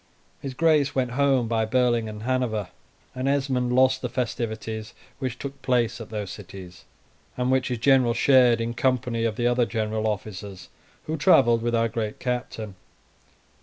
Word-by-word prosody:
His 135 -2 -6
Grace 150 -2 +2
went 125 -2 0
home 135 -2 +2
by 110 -1 +1
Berlin 120 -1 +1
and 105 0 -8
Hanover, 120 -5 -1 0.4
and 130 +1 -3
Esmond 135 -3 0
lost 130 0 +4
the - - -3
festivities 110 -2 -4 0.2
which 130 -3 -3
took 140 0 -7
place 120 -3 0
at 110 - -9
those 105 -4 -5
cities, 95 -2 -11 0.5
and 125 +1 0
which 130 -1 +2
his 125 - -2
general 125 -1 +3
shared 125 -2 +5
in 115 +1 -2
company 120 -2 0
of 110 -2 -1
the 120 - -2
other 120 -1 +2
general 110 -1 -2
officers 100 -2 -5 0.4
who 160 +1 -3
travelled 120 -5 +4
with 120 0 0
our 115 0 +2
great 110 -1 -4
captain. 120 -4 -4
120 Hz, 165 wpm, -25 LUFS, 110-130 Hz, 0.5 s, shared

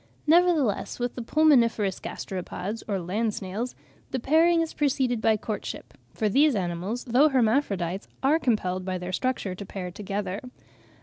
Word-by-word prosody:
Nevertheless 320 - +3
with 245 0 -1
the 245 - -6
pulmoniferous 235 - +3
gasteropods, 190 +3 -5
or 200 -3 0
land 205 +5 -1
snails, 210 +6 -4 0.3
the 260 - -2
pairing 330 +6 +4
is 325 - -3
preceded 260 -5 +1
by 220 -1 +3
courtship; 210 0 -6 0.2
for 220 - -1
these 280 +6 +4
animals, 185 +5 -2
though 260 +5 +4
hermaphrodites, 215 - +1 0.2
are 295 +4 +4
compelled 185 - 0
by 185 0 -2
their 180 +1 -5
structure 255 -5 -1
to 185 - -7
pair 185 -2 -6
together. 200 0 -4
225 Hz, 145 wpm, -26 LUFS, 190-265 Hz, 0.3 s, pairing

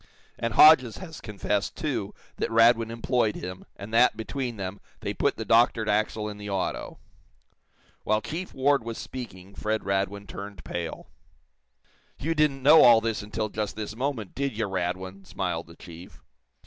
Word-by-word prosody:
And 115 -2 -2
Hodges 130 -7 +7
has 165 -4 -9
confessed, 105 -1 -2
too, - - -3 0.2
that - - -1
Radwin 115 0 +4
employed 115 -1 0
him, 90 0 -7
and 100 +3 -9
that, 120 -1 +5
between 120 +1 -4
them, 95 0 -5 0.2
they - - -3
put - - 0
the - - -4
doctored 115 -1 +3
axle 105 0 0
in 105 -1 -7
the 105 0 -7
auto." 95 -2 -3 1.1
While 110 0 +2
Chief 175 +4 -5
Ward 135 -1 +2
was 115 0 -5
speaking 100 -7 -8
Fred 110 +1 -2
Radwin 100 +1 -1
turned 100 -4 -8
pale. 85 -1 -5 1.1
"You 165 +4 -1
didn't 150 -4 +1
know 155 +3 +8
all 120 -2 +8
this 115 -1 -2
until 105 +1 -3
just 105 -1 -3
this 105 0 -5
moment, 125 -5 -3
did 135 -4 -3
you, 110 - 0
Radwin?" 95 0 -3
smiled - - -3
the - - -14
chief. 85 +2 -12
110 Hz, 160 wpm, -26 LUFS, 100-120 Hz, 1.1 s, know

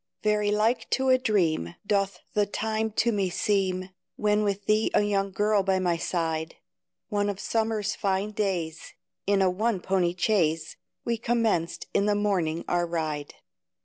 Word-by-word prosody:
Very 210 -1 +2
like 220 +3 +1
to 265 0 +1
a 255 0 +5
dream, 165 - +1
Doth 195 -3 0
the 205 -1 +2
time 220 +2 -1
to 235 +2 +2
me 200 -4 0
seem, 185 -1 0 0.2
When 210 0 +2
with 200 -1 -1
thee 215 +1 +3
a - - +5
young 200 -1 0
girl 205 +1 +2
by 190 0 +1
my 180 -2 +1
side, 165 -1 -2 0.5
One 205 -2 0
of 200 -1 -4
summer's 220 -2 0
fine 195 +1 -1
days, 185 -7 -3 0.3
In 200 -1 +3
a 185 - +4
one 215 +2 0
pony 180 -1 0
chaise, 165 -6 +1 0.3
We 235 -1 0
commenced 225 -8 0
in 200 - +2
the 205 - +3
morning 180 -6 0
our 175 0 +1
ride. 155 -3 -3
200 Hz, 160 wpm, -27 LUFS, 175-215 Hz, 0.5 s, a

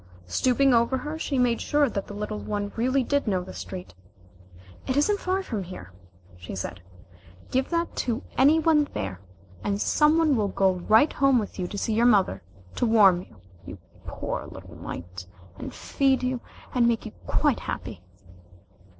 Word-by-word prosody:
Stooping 255 - +2
over 235 +3 +3
her 300 +4 -5
she 280 -3 -2
made 245 -2 +2
sure 295 -1 +2
that 200 -5 -4
the 205 - -8
little 210 0 -4
one 205 -1 -3
really 255 +3 +1
did 285 +1 0
know 185 -3 +1
the - - -10
street. 90 0 -8 0.9
"It 260 - 0
isn't 405 +8 +2
far 380 +1 -1
from 220 - -3
here," 170 - -9 0.5
she 90 +2 -8
said. 90 -1 -5 0.7
"Give 260 +1 0
that 335 0 -1
to 240 0 -1
any 285 +5 +5
one 310 -2 +3
there, 95 -1 -4 0.4
and 200 0 -1
somebody 310 +5 +3
will 220 -7 +2
go 190 -1 +2 0.2
right 220 +8 +5
home 275 -2 +4
with 210 -3 -3
you 180 - -1
to 205 - -6
see 220 - -1
your 235 +2 +4
mother, 195 - +3 0.4
to 245 - +2
warm 200 -6 +5
you, 100 - -17 0.2
you - - -9 0.3
poor - - -4
little - - -11
mite, 90 +1 -8 0.3
and - - -6
feed 270 -2 0
you, 255 -1 -1 0.3
and 240 -2 +3
make 235 -1 0
you 220 - -6 0.2
quite 290 -6 +2
happy." 100 -6 -6
235 Hz, 175 wpm, -26 LUFS, 190-275 Hz, 0.9 s, any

